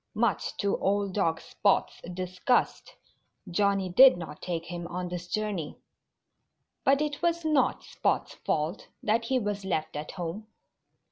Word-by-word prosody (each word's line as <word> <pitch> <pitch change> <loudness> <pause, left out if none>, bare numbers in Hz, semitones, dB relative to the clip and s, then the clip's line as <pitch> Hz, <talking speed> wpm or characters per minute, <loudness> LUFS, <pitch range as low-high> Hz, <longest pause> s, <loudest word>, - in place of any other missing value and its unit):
Much - - 0
to 200 -1 0
old 200 0 0
dog 165 -5 +1
Spot's 200 - 0
disgust, 185 +6 0 0.5
Johnnie 195 +1 +1
did 255 +3 +8
not 165 -3 -8
take 170 -2 -3
him 175 -1 -5
on 180 +1 -4
this 175 0 -5
journey. 205 -7 -3 1.1
But 275 +2 +4
it 295 0 -2
was 340 -1 +1
not 290 -5 +2
Spot's - - -1
fault 155 +5 -2 0.2
that 225 +2 +1
he 260 +2 +1
was 205 -4 -2
left 160 -6 -2
at 150 +1 -5
home. 185 +4 -5
195 Hz, 140 wpm, -28 LUFS, 175-220 Hz, 1.1 s, did